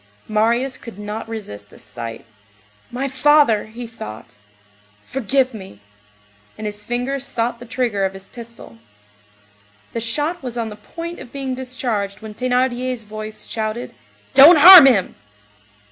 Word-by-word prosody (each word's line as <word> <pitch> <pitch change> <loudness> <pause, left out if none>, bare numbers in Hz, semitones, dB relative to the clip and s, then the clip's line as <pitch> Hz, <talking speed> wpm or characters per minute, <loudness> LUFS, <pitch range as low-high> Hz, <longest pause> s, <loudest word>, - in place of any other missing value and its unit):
Marius 235 +5 0
could 230 -5 -11
not 210 +2 -6
resist 105 - -8
this - - -15
sight. 115 -1 -8 0.6
"My 260 +3 -3
father," 270 -5 +3
he 235 +3 -8
thought, 110 - -10 0.7
"forgive 265 +1 0
me!" 190 - -11 0.8
And 215 - -7
his 210 0 -5
finger 245 +3 -2
sought 240 -3 -3
the 245 - -11
trigger 230 -5 -1
of 190 0 -1
his 195 0 -10
pistol. 230 - -11 1.1
The 230 - -2
shot 295 +10 -2
was 245 -3 -6
on 230 -1 -2
the 210 - -9
point 335 +10 -8
of 240 - -11
being 270 -2 -4
discharged 245 -6 -4
when 220 -1 -9
Thénardier's 250 0 -1
voice 215 0 -8
shouted:— 220 +2 -4 0.4
"Don't 290 +6 +9
harm 340 -1 +11
him!" 215 -8 +2
235 Hz, 140 wpm, -20 LUFS, 215-260 Hz, 1.1 s, harm